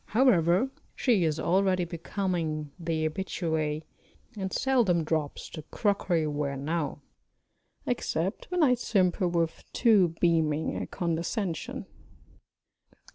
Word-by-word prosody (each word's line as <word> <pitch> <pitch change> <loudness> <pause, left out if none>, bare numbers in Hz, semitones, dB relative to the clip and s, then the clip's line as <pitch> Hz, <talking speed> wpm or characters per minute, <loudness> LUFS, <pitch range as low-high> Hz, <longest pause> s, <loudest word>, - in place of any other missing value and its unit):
However, 225 -1 +4 0.2
she 230 -9 +3
is 155 -1 0
already 185 0 +2
becoming 165 -3 -2
the 160 -2 0
habituée, 160 -3 -2 0.5
and 190 -2 -3
seldom 235 -11 +2
drops 155 -2 -2
the 155 - -8
crockery 190 -6 +1
ware 145 -2 -2
now 145 0 -2 0.8
except 190 -7 -2
when 360 -2 +2
I 260 -4 +5
simper 190 -6 +1
with 170 -1 -1
too 200 -9 +4
beaming 160 -3 +2
a - - -3
condescension. 170 +1 -2
170 Hz, 105 wpm, -28 LUFS, 155-195 Hz, 0.8 s, I